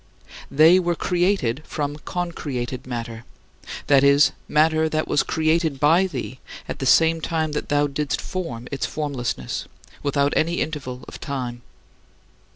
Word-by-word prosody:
They 160 Hz, +6 st, +6 dB
were 175 Hz, -1 st, 0 dB
created 175 Hz, -, 0 dB
from 145 Hz, -2 st, -3 dB
concreated 135 Hz, -8 st, -4 dB
matter 115 Hz, -2 st, -5 dB, 0.6 s
that 140 Hz, -1 st, +5 dB
is, 140 Hz, +1 st, +6 dB, 0.2 s
matter 155 Hz, +1 st, +3 dB
that 155 Hz, 0 st, -1 dB
was 145 Hz, -, +2 dB
created 160 Hz, -2 st, 0 dB
by 165 Hz, +6 st, +4 dB
thee 130 Hz, -, -6 dB, 0.3 s
at -, -, -5 dB
the 135 Hz, -, -1 dB
same 165 Hz, +3 st, +4 dB
time 160 Hz, -1 st, -1 dB
that 150 Hz, -, -4 dB
thou 145 Hz, 0 st, +3 dB
didst 145 Hz, 0 st, -2 dB
form 125 Hz, -11 st, -5 dB
its 140 Hz, -, -2 dB
formlessness, 130 Hz, -, -3 dB, 0.3 s
without 140 Hz, 0 st, +1 dB
any 170 Hz, +2 st, +1 dB
interval 130 Hz, -5 st, -4 dB
of -, -, -9 dB
time. 125 Hz, -4 st, -4 dB
145 Hz, 140 wpm, -23 LUFS, 130-160 Hz, 0.6 s, They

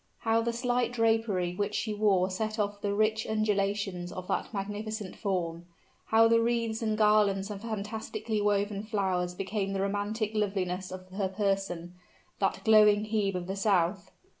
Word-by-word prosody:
How 225 Hz, 0 st, +2 dB
the 235 Hz, +1 st, 0 dB
slight 245 Hz, +1 st, 0 dB
drapery 225 Hz, -6 st, +1 dB
which 205 Hz, +2 st, -2 dB
she 215 Hz, -, -1 dB
wore 195 Hz, -3 st, +2 dB
set 215 Hz, +3 st, -2 dB
off 205 Hz, -1 st, -2 dB
the 205 Hz, -, -1 dB
rich 215 Hz, +1 st, +1 dB
undulations 200 Hz, -4 st, -1 dB
of 185 Hz, 0 st, -7 dB
that -, -, -1 dB
magnificent 210 Hz, 0 st, -4 dB
form! 175 Hz, -4 st, -2 dB, 0.4 s
How 225 Hz, +1 st, +6 dB
the 230 Hz, 0 st, +4 dB
wreaths 230 Hz, -1 st, 0 dB
and 215 Hz, -1 st, 0 dB
garlands 210 Hz, -2 st, +3 dB
of 200 Hz, -1 st, -6 dB
fantastically 220 Hz, 0 st, -3 dB
woven 205 Hz, 0 st, +1 dB
flowers 190 Hz, -4 st, -1 dB
became 195 Hz, +1 st, -2 dB
the 195 Hz, -, -1 dB
romantic 205 Hz, +2 st, -1 dB
loveliness 190 Hz, -3 st, -1 dB
of 185 Hz, 0 st, -8 dB
her 190 Hz, 0 st, -2 dB
person 195 Hz, -3 st, -2 dB, 0.5 s
that 195 Hz, -, 0 dB
glowing 210 Hz, -1 st, +6 dB
Hebe 210 Hz, -3 st, 0 dB
of 180 Hz, -1 st, -3 dB
the 190 Hz, +2 st, -4 dB
South! 195 Hz, -1 st, +1 dB
205 Hz, 160 wpm, -29 LUFS, 195-220 Hz, 0.5 s, How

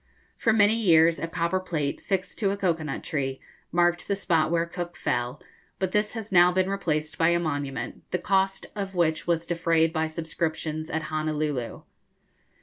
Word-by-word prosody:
For 225 Hz, -, +2 dB
many 210 Hz, -1 st, +5 dB
years 170 Hz, -7 st, +4 dB
a 165 Hz, -, -2 dB
copper 170 Hz, +2 st, 0 dB
plate, 155 Hz, -6 st, -2 dB
fixed 190 Hz, -2 st, -2 dB
to 200 Hz, -, +2 dB
a 200 Hz, -, -1 dB
cocoa 175 Hz, -5 st, 0 dB
nut 150 Hz, -3 st, -4 dB
tree, 135 Hz, -3 st, -2 dB, 0.3 s
marked 175 Hz, +1 st, +2 dB
the 200 Hz, -, +1 dB
spot 165 Hz, -5 st, +1 dB
where 170 Hz, 0 st, +1 dB
Cook 175 Hz, 0 st, -6 dB
fell, 120 Hz, +3 st, -1 dB, 0.4 s
but 190 Hz, -1 st, -1 dB
this 210 Hz, +1 st, +1 dB
has 225 Hz, -3 st, -6 dB
now 180 Hz, -1 st, +6 dB
been 185 Hz, +1 st, +1 dB
replaced 155 Hz, -6 st, -2 dB
by 165 Hz, 0 st, +5 dB
a 170 Hz, 0 st, +3 dB
monument, 145 Hz, -6 st, -3 dB
the -, -, 0 dB
cost 195 Hz, +1 st, +1 dB
of 195 Hz, -2 st, -4 dB
which 160 Hz, -2 st, +1 dB
was 170 Hz, -1 st, +1 dB
defrayed 165 Hz, -1 st, +2 dB
by 160 Hz, -1 st, 0 dB
subscriptions 160 Hz, -1 st, -3 dB
at 160 Hz, 0 st, -2 dB
Honolulu. 155 Hz, -5 st, -2 dB
170 Hz, 175 wpm, -26 LUFS, 155-185 Hz, 0.4 s, now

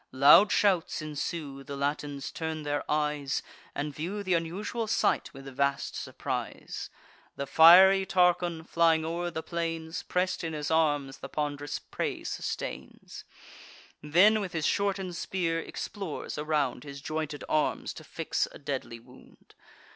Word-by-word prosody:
Loud 145 Hz, +10 st, +7 dB
shouts 190 Hz, -5 st, +2 dB
ensue; 150 Hz, -2 st, -4 dB
the 140 Hz, +1 st, -7 dB
Latins 145 Hz, 0 st, -3 dB
turn 160 Hz, -1 st, -4 dB
their 145 Hz, 0 st, -1 dB
eyes, 150 Hz, -2 st, 0 dB, 0.3 s
And 145 Hz, 0 st, -3 dB
view 185 Hz, +8 st, -4 dB
th' 190 Hz, -, -8 dB
unusual 190 Hz, +7 st, -2 dB
sight 215 Hz, -, +1 dB
with 135 Hz, -1 st, -12 dB
vast 140 Hz, +1 st, -1 dB
surprise. -, -, -5 dB, 0.5 s
The 140 Hz, -, -3 dB
fiery 190 Hz, +6 st, +8 dB
Tarchon, 175 Hz, -2 st, +2 dB
flying 165 Hz, -2 st, +3 dB
o'er 170 Hz, +2 st, -2 dB
the 160 Hz, -1 st, -5 dB
plains, 165 Hz, -1 st, -3 dB
Press'd 180 Hz, 0 st, -1 dB
in 165 Hz, -1 st, -3 dB
his 150 Hz, 0 st, -3 dB
arms 145 Hz, -4 st, +1 dB
the -, -, -8 dB
pond'rous 145 Hz, -1 st, -3 dB
prey -, -, -4 dB
sustains; -, -, -6 dB, 0.8 s
Then, 185 Hz, +9 st, +5 dB
with 190 Hz, -3 st, -5 dB
his 160 Hz, -3 st, -1 dB
shorten'd 195 Hz, -3 st, 0 dB
spear, 165 Hz, -3 st, -1 dB
explores 190 Hz, 0 st, -5 dB
around 150 Hz, -5 st, 0 dB
His 140 Hz, -1 st, -8 dB
jointed 155 Hz, 0 st, -4 dB
arms, 155 Hz, -1 st, 0 dB
to -, -, -11 dB
fix -, -, -2 dB
a -, -, -11 dB
deadly 130 Hz, -5 st, -5 dB
wound. 125 Hz, +2 st, -19 dB
160 Hz, 140 wpm, -29 LUFS, 145-175 Hz, 0.8 s, fiery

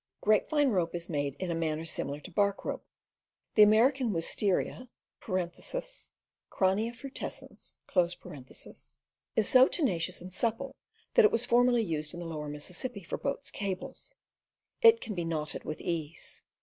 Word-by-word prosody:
Grapevine 275 Hz, +7 st, +3 dB
rope 175 Hz, -4 st, 0 dB
is 170 Hz, 0 st, -3 dB
made 145 Hz, -3 st, -1 dB
in 185 Hz, -2 st, -3 dB
a -, -, 0 dB
manner 160 Hz, -1 st, -1 dB
similar 145 Hz, -3 st, -2 dB
to 190 Hz, -, -10 dB
bark 200 Hz, +2 st, +1 dB
rope. -, -, -3 dB, 0.7 s
The 215 Hz, -, +6 dB
American 235 Hz, +5 st, +5 dB
wistaria 200 Hz, +7 st, 0 dB, 0.3 s
(Kraunhia 210 Hz, -, -2 dB
fru 270 Hz, +3 st, -8 dB
tescens) 170 Hz, -, -5 dB, 0.4 s
is 220 Hz, -, +3 dB
so 260 Hz, 0 st, +7 dB
tenacious 185 Hz, -, 0 dB
and 180 Hz, +1 st, -9 dB
supple 235 Hz, +6 st, -1 dB, 0.4 s
that 480 Hz, -, +7 dB
it -, -, +5 dB
was 235 Hz, +1 st, +2 dB
formerly 245 Hz, -1 st, +4 dB
used 155 Hz, -4 st, -3 dB
along 175 Hz, -1 st, -6 dB
the 165 Hz, -, -5 dB
lower 150 Hz, -1 st, -4 dB
Mississippi 180 Hz, -, -2 dB
for 170 Hz, -, -4 dB
boats' 280 Hz, 0 st, -3 dB
cables; 200 Hz, -, -5 dB, 0.7 s
it 460 Hz, -1 st, +7 dB
can 215 Hz, -, -4 dB
be 175 Hz, -3 st, -2 dB
knotted 155 Hz, -2 st, -3 dB
with 155 Hz, -, -4 dB
ease. 165 Hz, -2 st, -3 dB
190 Hz, 145 wpm, -30 LUFS, 165-240 Hz, 0.7 s, so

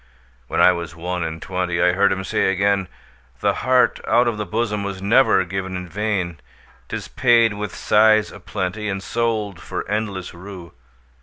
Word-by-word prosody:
When -, -, -2 dB
I -, -, +7 dB
was 85 Hz, -2 st, -5 dB
one 90 Hz, +1 st, -3 dB
and 80 Hz, 0 st, -4 dB
twentyI 90 Hz, -1 st, 0 dB
heard 100 Hz, +1 st, +3 dB
him 95 Hz, 0 st, -2 dB
say 95 Hz, -, +1 dB
again,'The 100 Hz, -1 st, -2 dB
heart 130 Hz, 0 st, +3 dB
out 120 Hz, +1 st, +4 dB
of 115 Hz, -3 st, -1 dB
the 105 Hz, -, -3 dB
bosomWas 105 Hz, -4 st, -2 dB
never 100 Hz, -1 st, +4 dB
given 95 Hz, 0 st, -4 dB
in 90 Hz, 0 st, -6 dB
vain;'Tis 95 Hz, -4 st, -5 dB
paid 115 Hz, -3 st, +4 dB
with 105 Hz, +1 st, -5 dB
sighs 110 Hz, 0 st, +4 dB
a -, -, -11 dB
plentyAnd 95 Hz, 0 st, -3 dB
sold 110 Hz, -4 st, -2 dB
for -, -, -5 dB
endless 100 Hz, -3 st, -3 dB
rue. 90 Hz, -1 st, -10 dB
100 Hz, 150 wpm, -21 LUFS, 90-110 Hz, -, I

